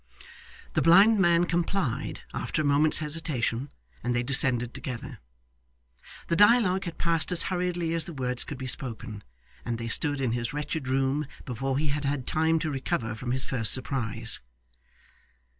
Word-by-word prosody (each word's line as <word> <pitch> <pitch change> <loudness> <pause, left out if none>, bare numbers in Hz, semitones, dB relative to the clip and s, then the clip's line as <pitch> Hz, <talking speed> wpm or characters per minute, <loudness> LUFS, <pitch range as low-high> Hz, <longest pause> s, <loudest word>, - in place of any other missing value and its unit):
The - - +1
blind 200 +6 +6
man 175 -2 +4
complied 175 - -2
after 155 - -2
a - - -2
moment's 145 +2 +4
hesitation, 145 -5 -2 0.3
and 120 +1 -1
they 120 - 0
descended 125 -2 +1
together. 125 -3 -7 1.1
The 170 - +1
dialogue 205 -2 +4
had 170 -2 -6
passed 170 0 0
as 180 - +1
hurriedly 175 -2 -1
as 165 -1 0
the 170 - -8
words 125 -3 -2
could 145 - -7
be 130 - -6
spoken, 120 -4 -2 0.4
and 120 -1 -3
they 115 0 -5
stood 145 +3 +1
in 130 -3 0
his 120 +2 -2
wretched 150 -1 -4
room 135 +2 0 0.2
before 135 +1 -2
he 150 +1 0
had 145 +1 -2
had 140 -2 -1
time 160 +1 +1
to 155 - -2
recover 125 -4 -2
from 120 +2 -5
his 130 +1 +2
first 115 -5 +5
surprise. 115 -4 -1
140 Hz, 160 wpm, -27 LUFS, 125-165 Hz, 1.1 s, blind